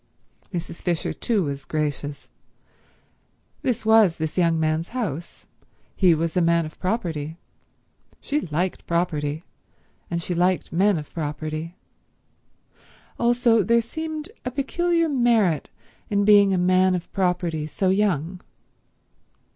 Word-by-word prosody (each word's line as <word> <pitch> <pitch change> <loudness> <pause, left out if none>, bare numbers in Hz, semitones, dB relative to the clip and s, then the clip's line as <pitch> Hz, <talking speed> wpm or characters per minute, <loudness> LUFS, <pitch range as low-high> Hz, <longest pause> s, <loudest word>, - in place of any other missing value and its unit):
Mrs. 170 -2 -5
Fisher 175 -3 -1
too 220 -5 0
was 140 -2 -4
gracious. 145 -1 -3 1.3
This 235 -4 -1
was 220 -6 +5
this 160 -1 -3
young 170 -3 +2
man's 160 +1 0
house. 170 - -5 0.5
He 180 -4 +4
was 165 +1 -2
a 180 - +3
man 170 -1 +3
of 155 - -11
property. 165 -6 -2 0.8
She 295 - -1
liked 175 +3 -3
property, 160 -3 -1 0.7
and 170 - -1
she 175 +2 -3
liked 180 +1 +1
men 195 +2 +3
of 150 -2 -8
property. 155 +1 -4 1.4
Also 240 -1 +3
there 235 +5 +3
seemed 315 - -5
a 250 - -2
peculiar 335 +6 0
merit 235 - +2 0.4
in 205 -1 +1
being 205 -1 +6
a 190 - +2
man 185 +1 +3
of 180 - -6
property 175 -4 0
so 185 +4 0
young. 185 -3 0
180 Hz, 125 wpm, -24 LUFS, 160-215 Hz, 1.4 s, being